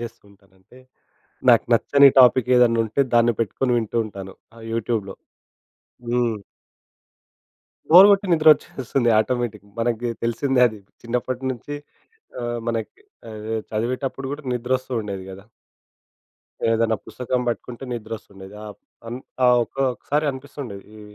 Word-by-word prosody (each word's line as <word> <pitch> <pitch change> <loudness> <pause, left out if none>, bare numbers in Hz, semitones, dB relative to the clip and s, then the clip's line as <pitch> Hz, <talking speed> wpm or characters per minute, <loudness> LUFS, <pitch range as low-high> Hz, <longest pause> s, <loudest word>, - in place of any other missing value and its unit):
చేస్తూంటానంటే, 100 -1 -13 0.7
నాకు 115 - +5
నచ్చని 140 +4 +6
టాపిక్ 125 0 +5
ఏదన్న 115 -2 +4
ఉంటే 110 +5 -2
దాన్ని 120 0 +4
పెట్టుకొని 125 +4 -1
వింటూ 110 0 -4
ఉంటాను. 95 -2 -9 0.2
ఆ - - -13
యూట్యూబ్‌లో. 110 -4 -2 0.9
హ్మ్. 120 -1 +1 1.6
Bore 180 +5 +10
గొట్టి 200 0 +2
నిద్రొ‌చ్చేస్తుంది 135 -6 +3
automatic. 110 -3 -2
మనకి 120 0 -1
తెలిసిందే 125 +3 +1
అది. 110 -2 -9 0.2
చిన్నప్పటి 125 +2 -3
నుంచి 130 +4 -7 0.7
ఆహ్, 120 0 -3
మనకి 115 - -4 0.3
ఆహ్, 110 -1 -8 0.2
చదివేటప్పుడు 130 +4 -3
కూడా 150 +1 -9
నిద్ర 125 +1 -4
వస్తు 130 0 -16
ఉండేది 100 -3 -6
గదా? 95 +1 -11 1.3
ఏదన్నా 115 0 +2
పుస్తకం 125 0 -2
పట్టుకుంటే 120 +1 -4
ని‌ద్రొ‌స్తూండేది. 105 -4 -8
ఆహ్, 105 - -9 0.3
అన్ 120 +2 -5 0.3
ఆ - - +6 0.2
ఒకొక్కసారి 135 +4 -2
అనిపిస్తుండేది, 130 -6 -9
ఈ - - -12
120 Hz, 115 wpm, -22 LUFS, 110-130 Hz, 1.6 s, Bore